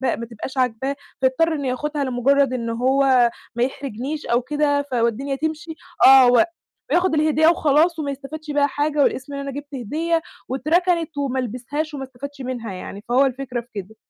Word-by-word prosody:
ما 235 - -6
تبقاش 235 +3 -8
عاجباه، 255 +2 0 0.3
فيضطر 290 +6 +2
إنه 285 -3 -3
ياخُدها 290 +3 -2
لمُجرّد 265 +1 +2
إن 230 -2 -3
هو 255 0 +3 0.2
ما 235 - +1
يحرجنيش 270 +3 -4
أو 240 +1 +2
كده، 285 +2 +1
ف 285 -2 -10
والدنيا 245 +4 0
تمشي 315 +2 -4 0.3
آه، 265 -1 +9
و 245 +5 +6 0.5
وياخد 355 0 +2
الهدية 310 0 +3
وخلاص، 320 +1 +3
وما 285 -2 -2
يستفيدش 300 +3 -7
بيها 285 0 +3
حاجة، 290 0 +1
والاسم 285 +2 -1
إن 280 - -4
أنا 280 0 -4
جِبت 285 +1 -8
هدية 320 +8 -1 0.3
واتركنِت 330 +4 0
وما 265 -2 -1
لبسهاش 255 +6 -4
وما 275 -2 -5
استفادش 270 +2 -9
منها 245 -5 -5
يعني، 195 +2 -8
فهو 260 +3 +4
الفكرة 255 -2 -3
في 235 - -23
كده. 205 +2 -7
275 Hz, 175 wpm, -22 LUFS, 250-300 Hz, 0.5 s, آه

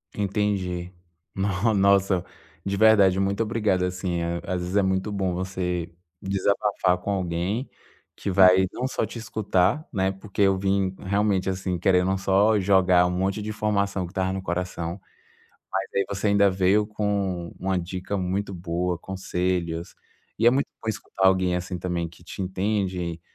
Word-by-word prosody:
Entendi. 95 -3 -1 0.4
No 100 +3 +1
nossa, 100 -2 +3 0.4
de 100 0 -2
verdade, 100 -3 +5
muito 100 +2 0
obrigado 105 -5 +1
assim, 90 -1 -2
a 85 0 -1
às 90 -1 -2
vezes 90 +2 -4
é 100 - +4
muito 95 +2 0
bom 95 -3 -1
você 90 -2 -3 0.3
desabafar 95 -1 +1
com 100 - -5
alguém 95 +6 -2 0.5
que - - -4
vai, 95 0 +6
não 130 +1 -3
só 115 - -2
te 115 - -8
escutar, 110 - 0
né. 95 -1 +1
Porque 100 +1 -2
eu 95 -1 +4
vim 95 -1 0
realmente 100 -1 0
assim, 95 -1 -2
querendo 90 +1 +3
só 100 +3 +3
jogar 90 -2 +4
um - - -1
monte 95 +3 -1
de 105 - -5
informação 100 -3 -1
que 85 - -10
estava 95 -1 -1
no 95 - -3
coração, 90 0 -3 0.7
mas 95 0 -1
aí 100 - +3
você 100 +1 -1
ainda 100 -1 +4
veio 95 +3 +2
com 100 -5 -2
uma 95 0 0
dica 95 +3 -4
muito 95 +2 -2
boa, 90 0 -2
conselhos. 90 -2 -3 0.5
E 115 - +5
é - - +10
muito 135 +3 +1
bom 110 - -3
escutar 95 -3 0
alguém 95 -1 +2
assim 90 +1 -4
também 85 -1 -3
que 85 +1 -18
te 90 - -7
entende, 95 -3 -2
95 Hz, 160 wpm, -25 LUFS, 90-100 Hz, 0.7 s, é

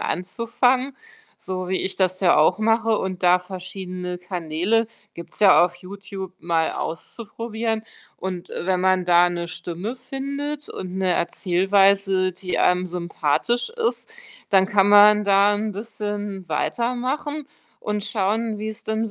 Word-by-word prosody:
anzufangen, 245 +7 0 0.4
so 185 -1 -5
wie 190 - 0
ich 190 0 -1
das 185 -1 +1
ja 180 -2 +4
auch 155 +7 +4
mache. 225 0 +2
Und 185 -1 -4
da 180 0 +5
verschiedene 180 -1 -6
Kanäle- 180 +5 -1 0.3
gibt's 170 - -10
ja 190 -4 +7
auf 175 0 -4
Youtube- 195 0 -8
mal 165 -1 0
auszuprobieren. 225 +5 -4 0.3
Und, 185 -2 -6
äh, 175 - -5
wenn 185 -1 +1
man 185 -1 +2
da 175 0 +5
'ne 170 -1 -3
Stimme 175 +6 -5
findet 280 +3 -5
und 185 0 -6
'ne 185 -2 +2
Erzählweise, 195 +1 +2
die 180 +1 -4
einem 180 0 +2
sympathisch 175 - -1
ist, 460 -1 -2 0.4
dann 190 -1 +4
kann 200 0 +3
man 210 +1 +7
da 200 +1 +4
'n 215 +1 -2
bisschen 205 -3 -5
weitermachen 255 - -2 0.3
und 210 -1 -3
schauen, 215 +1 -1
wie 215 +1 -4
es 220 +1 -7
denn 220 0 -2
195 Hz, 140 wpm, -23 LUFS, 180-225 Hz, 0.4 s, ja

